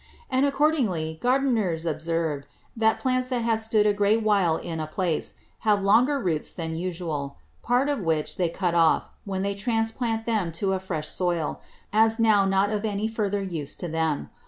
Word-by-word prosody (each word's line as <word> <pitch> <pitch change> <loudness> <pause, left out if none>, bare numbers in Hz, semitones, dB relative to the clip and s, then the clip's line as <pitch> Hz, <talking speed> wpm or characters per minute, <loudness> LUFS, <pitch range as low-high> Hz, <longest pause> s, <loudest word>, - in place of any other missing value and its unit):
And 260 +2 +3
accordingly 245 - 0
Gardiners 235 -10 +1
observe, 160 -2 -1 0.3
that 220 -1 +2
Plants 255 -1 0
that 250 -2 -1
have 225 -1 +1
stood 220 -1 +2
a 210 - +4
great 205 +2 +2
while 195 -6 +3
in 165 -2 -5
a 155 - -3
Place, 170 -1 -1 0.2
have 205 -2 +2
longer 245 +8 +4
Roots 165 - -1
than 165 -2 -4
usual; 165 - -4 0.2
part 245 +3 +2
of 290 -1 0
which 160 -5 -1
they 175 -2 +1
cut 175 0 -1
off, 165 -1 +3 0.2
when 190 -1 -2
they 200 0 -1
transplant 225 +2 -1
them 215 -7 0
to 190 +3 -1
a 190 - -1
fresh 165 -5 -4
Soil, 175 -4 -1 0.3
as 220 +1 +4
now 215 -3 +4
not 195 +1 +2
of 210 0 -2
any 210 0 -1
further 205 -3 -1
use 160 -7 -4
to 175 - -5
them. 160 -2 -1
200 Hz, 180 wpm, -25 LUFS, 165-225 Hz, 0.3 s, a